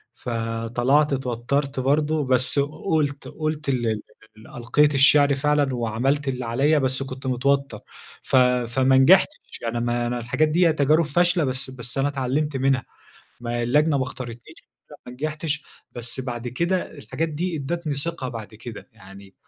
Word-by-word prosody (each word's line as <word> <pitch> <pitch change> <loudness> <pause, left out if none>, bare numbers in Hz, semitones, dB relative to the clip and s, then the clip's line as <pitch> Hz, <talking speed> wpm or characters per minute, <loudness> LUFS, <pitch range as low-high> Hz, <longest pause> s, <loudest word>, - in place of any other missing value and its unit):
فطلعت 120 +5 0
اتوترت 135 +2 -2
برضه، 150 +3 +1
بس 130 +2 +3
قُلت 145 -1 -1
قُلت 155 -1 -4
ال 120 -3 0 0.5
ال 110 - -15
ألقيت 140 +5 +1
الشِعر 140 +1 +6
فعلًا 145 -1 +1
وعملت 125 +5 -1
اللي 125 -2 -2
عليَّ 140 +7 +2
بس 130 0 0
كنت 135 0 -7
متوتر 140 +2 0 0.4
ف - - -2
فما 125 +1 +3
نجحتش، 190 - +3
يعني 120 0 -2
ما 120 0 -1
أنا 120 0 -2
الحاجات 125 +7 +1
دِيَّة 165 +1 +3
تجارب 155 +2 +2
فاشلة 175 +3 +2
بس 130 0 -2
بس 125 +1 -6
أنا 135 +1 +2
اتعلمت 140 +1 -1
منها. 135 -1 +1 0.6
ما 120 0 -2
اللجنة 145 +4 +2
ما 130 - 0
اختارتنيش 120 -2 -8 0.2
علشان - - -18
ما 125 - -9
نجحتش، 155 +2 -3 0.3
بس 120 +1 -5
بعد 125 -2 -5
كده 170 +9 -1
الحاجات 160 +3 -4
دي 170 +3 -3
أدتني 155 +2 -3
ثقة 140 -2 -3
بعد 115 -3 -7
كده، 115 0 -10
يعني 95 0 -15
135 Hz, 150 wpm, -23 LUFS, 120-150 Hz, 0.6 s, الشِعر